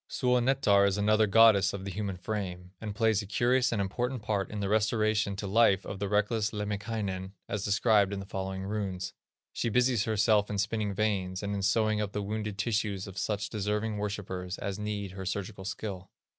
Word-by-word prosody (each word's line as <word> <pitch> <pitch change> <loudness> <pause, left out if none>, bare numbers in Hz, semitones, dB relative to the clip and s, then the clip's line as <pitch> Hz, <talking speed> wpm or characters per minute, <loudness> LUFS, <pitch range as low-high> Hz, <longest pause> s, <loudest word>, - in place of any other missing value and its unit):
Suonetar 125 -5 +3
is 100 0 0
another 110 +1 +3
goddess 100 -2 +6
of 95 -1 -5
the 100 - -4
human 100 0 -3
frame, 90 -2 -4
and 105 -2 -5
plays 110 -2 +2
a 100 - -8
curious 125 +4 +2
and 115 - 0
important 120 +5 -2
part 100 -2 -1
in 105 - -5
the 100 - -1
restoration 110 -1 +1
to 100 - -5
life 100 -1 +3
of 100 - -6
the 100 - -2
reckless 105 +1 +1
Lemminkainen, 105 -2 -3
as 105 -1 -3
described 105 -1 +3
in 100 - -3
the 95 - -6
following 95 0 -4
runes. 95 -2 -3 0.4
She 115 - -1
busies 125 -1 +2
herself 110 -1 +3
in 105 - -2
spinning 100 0 -1
veins, 95 -3 -1
and 100 0 -2
in 100 - -2
sewing 105 +2 +2
up 100 -1 -3
the 105 - -2
wounded 105 0 -3
tissues 105 -3 -1
of 100 -1 -7
such 105 -4 -2
deserving 105 +1 -1
worshipers 95 -3 -4
as 100 0 -4
need 105 -2 -3
her 95 0 -7
surgical 95 +1 -4
skill. 95 -2 -5
105 Hz, 190 wpm, -30 LUFS, 95-110 Hz, 0.4 s, goddess